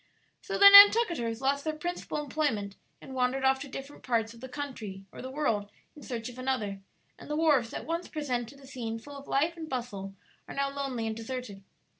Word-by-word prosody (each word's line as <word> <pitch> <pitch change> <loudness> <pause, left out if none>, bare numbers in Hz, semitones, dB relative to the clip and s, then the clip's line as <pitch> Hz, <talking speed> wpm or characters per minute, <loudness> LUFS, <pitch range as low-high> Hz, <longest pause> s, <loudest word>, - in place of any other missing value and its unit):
"So - - -4
the 400 - +9
Nantucketers 400 - +7
lost 280 +1 +1
their 310 -1 -2
principal 345 0 -4
employment, 265 -9 -1 0.3
and 265 - -9
wandered 260 +1 0
off 265 0 +4
to 285 - -7
different 275 +1 -9
parts 230 -2 0
of 230 - -15
the 260 - -8
country 225 -9 -6
or - - -10
the 260 - -6
world 230 -8 -1 0.3
in 300 - -13
search 235 -4 -5
of 250 0 -9
another; 220 -7 -2 0.4
and - - -12
the 300 - -1
wharves 295 -8 +3
that - - -6
once 335 +2 -3
presented 275 -3 -4
a 275 - -15
scene 240 -4 -5
full 285 +5 -11
of 280 0 -10
life 315 +5 +1
and 320 -2 -8
bustle 205 -7 -5 0.3
are - - -8
now 275 0 0
lonely 270 -5 -3
and 220 0 -2
deserted. 225 -3 -6
265 Hz, 205 wpm, -29 LUFS, 230-290 Hz, 0.4 s, the